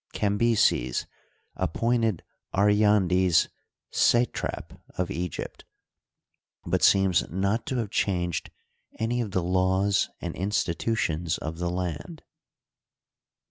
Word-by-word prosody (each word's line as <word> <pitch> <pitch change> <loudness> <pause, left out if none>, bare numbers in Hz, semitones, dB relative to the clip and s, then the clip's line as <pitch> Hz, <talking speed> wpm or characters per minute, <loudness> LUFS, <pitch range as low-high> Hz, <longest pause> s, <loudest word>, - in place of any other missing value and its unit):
Cambyses 105 - +2 0.5
ap 90 -4 -2
pointed 115 -5 +1 0.3
Aryandes 95 -4 +3 0.4
satrap 120 +1 0 0.2
of 90 - -1
Egypt, 90 0 -5 1.0
but - - 0
seems 95 -3 +4
not 100 +6 -1
to 130 - -2
have 110 -4 -2
changed 90 -4 -1 0.5
any 120 +2 0
of 110 - -3
the 95 -2 -1
laws 95 +2 +2
and 85 -1 -5
institutions 90 -3 -1
of 80 +1 -6
the 90 0 -1
land. 90 - -4
95 Hz, 100 wpm, -26 LUFS, 90-105 Hz, 1.0 s, seems